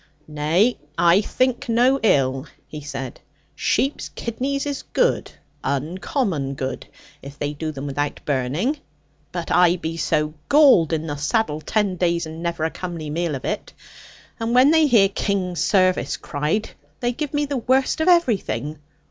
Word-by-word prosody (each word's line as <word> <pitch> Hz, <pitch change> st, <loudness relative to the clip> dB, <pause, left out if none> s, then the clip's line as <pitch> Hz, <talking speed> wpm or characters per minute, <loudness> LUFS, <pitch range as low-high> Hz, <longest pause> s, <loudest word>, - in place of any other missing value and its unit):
'Nay, 155 Hz, +10 st, +1 dB, 0.2 s
I 170 Hz, +3 st, +5 dB
think 255 Hz, +2 st, -1 dB
no 250 Hz, +4 st, +3 dB
ill,' 135 Hz, -8 st, +2 dB, 0.2 s
he 150 Hz, -, -8 dB
said; 135 Hz, -3 st, -6 dB, 0.3 s
'sheep's 275 Hz, +2 st, 0 dB
kidneys 270 Hz, +5 st, -3 dB
is 285 Hz, -1 st, -3 dB
good, -, -, 0 dB, 0.3 s
uncommon 150 Hz, -, -2 dB
good, 130 Hz, -1 st, -4 dB, 0.3 s
if 140 Hz, +1 st, -10 dB
they 145 Hz, 0 st, -2 dB
do 155 Hz, +2 st, -4 dB
them 140 Hz, -1 st, -7 dB
without 145 Hz, +1 st, -2 dB
burning. 150 Hz, -, 0 dB, 0.5 s
But -, -, -4 dB
I 180 Hz, -1 st, +5 dB
be 165 Hz, -2 st, -4 dB
so 150 Hz, -1 st, 0 dB, 0.2 s
galled 280 Hz, -, +6 dB
in 160 Hz, -1 st, -1 dB
the 145 Hz, -2 st, -4 dB
saddle 155 Hz, +1 st, 0 dB
ten 200 Hz, 0 st, 0 dB
days, 170 Hz, -1 st, +1 dB
and 160 Hz, +1 st, -8 dB
never 170 Hz, -2 st, -2 dB
a 160 Hz, -, 0 dB
comely 170 Hz, -4 st, -6 dB
meal 165 Hz, -1 st, -1 dB
of 130 Hz, -, -7 dB
it. 210 Hz, -, -3 dB, 0.7 s
And 230 Hz, +1 st, -1 dB
when 260 Hz, +4 st, +6 dB
they 320 Hz, -1 st, +5 dB
hear 225 Hz, -7 st, +5 dB
"King's 195 Hz, -3 st, -1 dB
service" 185 Hz, -2 st, +2 dB
cried, 150 Hz, +9 st, -2 dB, 0.3 s
they 240 Hz, -, 0 dB
give 295 Hz, +3 st, -4 dB
me 290 Hz, 0 st, 0 dB
the 280 Hz, -1 st, -2 dB
worst 260 Hz, +5 st, +1 dB
of 315 Hz, -, +1 dB
everything. 190 Hz, -, +1 dB
175 Hz, 155 wpm, -22 LUFS, 150-240 Hz, 0.7 s, galled